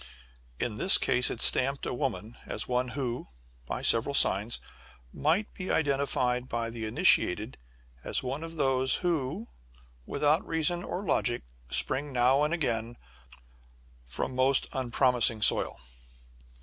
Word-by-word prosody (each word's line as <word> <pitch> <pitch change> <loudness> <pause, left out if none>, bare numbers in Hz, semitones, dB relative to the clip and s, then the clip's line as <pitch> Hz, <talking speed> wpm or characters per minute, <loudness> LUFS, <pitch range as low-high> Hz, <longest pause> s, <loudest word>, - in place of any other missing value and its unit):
In 110 -3 -2
this 190 - +6
case 125 - +2
it - - -4
stamped 135 +2 +4
a - - -3
woman 120 -3 -4
as - - -4
one 125 0 0
who 125 -3 -3 0.4
by - - -4
several 130 +5 +2
signs 105 -1 +1 0.6
might 170 +8 0
be 185 0 -6
identified 135 -4 0
by 115 0 -3
the 115 -1 -5
initiated 110 - +1 0.4
as - - -1
one 135 +4 -4
of 165 0 -8
those, 130 -3 +1
who, 165 - -1 0.6
without 150 +4 +1
reason 165 +2 0
or 185 +4 -5
logic, 120 -6 0 0.3
spring 140 - 0
now 130 +2 +3
and 150 +1 +1
again 120 -8 -2 1.1
from 60 - -5
most 130 +1 +2
unpromising 125 -3 +2
soil! - - +3
130 Hz, 130 wpm, -28 LUFS, 120-150 Hz, 1.1 s, this